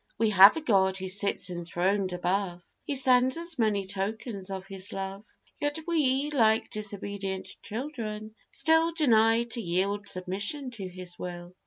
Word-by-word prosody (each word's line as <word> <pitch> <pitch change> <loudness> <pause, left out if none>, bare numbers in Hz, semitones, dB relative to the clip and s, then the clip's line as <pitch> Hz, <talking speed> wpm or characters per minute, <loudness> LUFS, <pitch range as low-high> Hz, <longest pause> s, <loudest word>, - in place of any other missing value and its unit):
We 225 -1 +2
have 195 +6 +9
a - - -2
God 190 -8 +2
who 190 0 -5
sits 200 -1 -1
enthroned 180 +3 -1
above; 180 0 -1 0.2
He 285 - -2
sends 260 +1 +4
us 335 -4 -1
many 210 -3 +1
tokens 200 +1 -4
of 190 -1 -5
his 195 0 -6
love: 195 +1 -5 0.4
Yet 290 +1 -1
we, 295 -3 +1
like 220 -6 +3
disobedient 200 -2 -4
children, 220 -3 -5 0.2
still 325 +1 +2
Deny 230 -6 +4
to 235 0 -4
yield 200 +2 -1
submission 200 +10 -2
to 205 -6 -6
His 180 -1 -7
will. 175 0 -7
205 Hz, 150 wpm, -28 LUFS, 190-245 Hz, 0.4 s, have